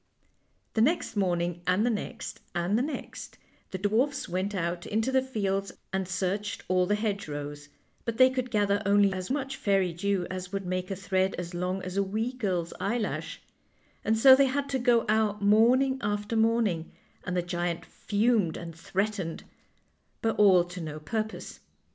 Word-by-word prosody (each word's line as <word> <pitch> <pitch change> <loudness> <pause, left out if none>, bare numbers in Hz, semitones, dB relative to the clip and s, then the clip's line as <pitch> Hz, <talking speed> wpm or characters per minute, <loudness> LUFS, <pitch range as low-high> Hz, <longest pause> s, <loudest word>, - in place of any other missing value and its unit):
The 220 - +2
next 310 +3 +1
morning, 175 -3 0
and 185 +5 +3
the 245 - +2
next, 230 +2 -5 0.2
and 175 +4 +1
the 235 - +2
next, 295 +3 -6 0.3
the 190 - -4
dwarfs 225 +9 0
went 190 +3 -2
out 175 -1 -2
into 220 +5 0
the 265 0 +4
fields 200 -6 -2 0.2
and 190 -1 -1
searched 195 +3 -2
all 185 0 +2
the 205 - +2
hedgerows, 145 -9 -4 0.3
but 230 -1 -3
they 255 0 +7
could 255 -1 -2
gather 205 -2 +1
only 200 -1 +4
as 185 -1 -5
much 270 0 -2
fairy 195 -3 +1
dew 190 +1 0
as 185 0 -5
would 195 -1 -3
make 185 0 -2
a 195 - -2
thread 190 0 0
as 175 0 -6
long 180 +2 -2
as 185 +1 -5
a 200 - +3
wee 220 +6 -2
girl's 185 -9 -2
eyelash; 225 +2 -2 0.6
and 220 +1 +2
so 260 +3 +9
they 275 0 +4
had 280 +2 -1
to 265 -1 0
go 240 -2 +3
out 210 -1 +1
morning 250 +6 +4
after 205 +2 -2
morning, 220 -7 +1 0.3
and 180 0 -2
the 175 - +1
giant 175 -1 -2
fumed 210 -5 +1
and 170 -2 -8
threatened, 190 0 -2 0.8
but 225 0 +1
all 190 -4 +7
to 175 +1 -8
no 155 -1 -5
purpose. 220 +7 -4
200 Hz, 170 wpm, -28 LUFS, 180-225 Hz, 0.8 s, so